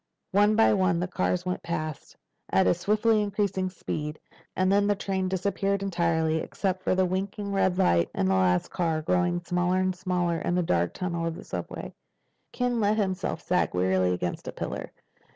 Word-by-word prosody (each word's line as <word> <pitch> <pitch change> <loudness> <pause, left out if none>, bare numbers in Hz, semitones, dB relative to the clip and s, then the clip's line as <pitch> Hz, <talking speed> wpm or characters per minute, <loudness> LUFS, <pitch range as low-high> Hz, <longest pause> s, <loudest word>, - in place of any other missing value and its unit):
One 205 +2 +4
by 225 - +5
one 185 -3 +2
the 180 - -1
cars 180 0 -1
went 180 0 -2
past, 155 -3 -5 0.4
at 95 - +4
a 90 - +5
swiftly 215 +1 +2
increasing 200 -2 -1
speed. 155 -4 -5 0.4
And 185 0 +2
then 200 +1 +3
the 205 - +3
train 190 -1 -2
disappeared 195 +1 -1
entirely, 165 -4 +1
except 185 +3 -2
for 185 - +1
the 185 0 +3
winking 195 +2 -3
red 190 -2 +1
light 85 - +3
on 95 - +1
the 95 - +2
last 90 -1 +2
car, 165 -3 -1
growing 175 +1 +1
smaller 175 +1 0
and 185 0 +1
smaller 175 -2 -1
in 175 - -1
the 180 - +2
dark 85 - 0
tunnel 170 -2 -2
of 165 - -3
the - - -9
subway. - - -6 0.6
Ken 245 -1 0
let 210 0 +2
himself 190 -5 -1
sag 180 - +1
wearily 95 0 +2
against 90 -1 -3
a - - -3
pillar. - - -5
180 Hz, 185 wpm, -27 LUFS, 165-195 Hz, 0.6 s, by